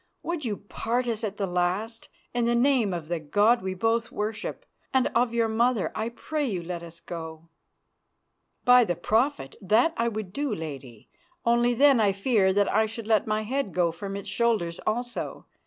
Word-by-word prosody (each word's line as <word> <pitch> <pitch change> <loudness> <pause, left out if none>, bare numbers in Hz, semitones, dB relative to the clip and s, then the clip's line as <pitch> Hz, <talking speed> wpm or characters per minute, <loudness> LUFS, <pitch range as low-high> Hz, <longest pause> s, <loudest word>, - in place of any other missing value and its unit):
Would 340 -3 -3
you 210 -4 -2
part 235 +4 -2
us 230 -1 -2
at 205 -2 -3
the 200 - 0
last? 185 +6 -2 0.2
In 240 -1 +1
the 235 0 +2
name 245 -4 +3
of 170 -3 -4
the 170 0 -2
God 205 +10 +3
we 190 0 -3
both 225 +3 0
worship, 210 +1 -4 0.3
and 260 -1 +3
of 240 0 +2
your 230 -1 +1
mother, 225 -1 +1
I 220 +1 -2
pray 300 +5 -3
you 185 -7 -3
let 170 0 -5
us 170 0 -10
go." 165 -1 -8 1.2
"By 250 -1 +7
the 175 -6 -1
Prophet, 220 - 0
that 220 - +3
I 230 - +1
would 215 -5 -4
do, 280 -4 -1
Lady, 135 - -8 0.4
only 240 +1 +3
then 275 0 +5
I 205 -3 +3
fear 200 0 +2
me 190 - +3
that 205 +1 +2
I 220 +1 +3
should 225 0 -7
let 215 -1 +2
my 215 0 0
head 250 -2 -2
go 175 -2 +2
from 195 +4 -6
its 200 0 -6
shoulders 195 -5 0
also. 240 +2 -3
215 Hz, 190 wpm, -26 LUFS, 185-235 Hz, 1.2 s, By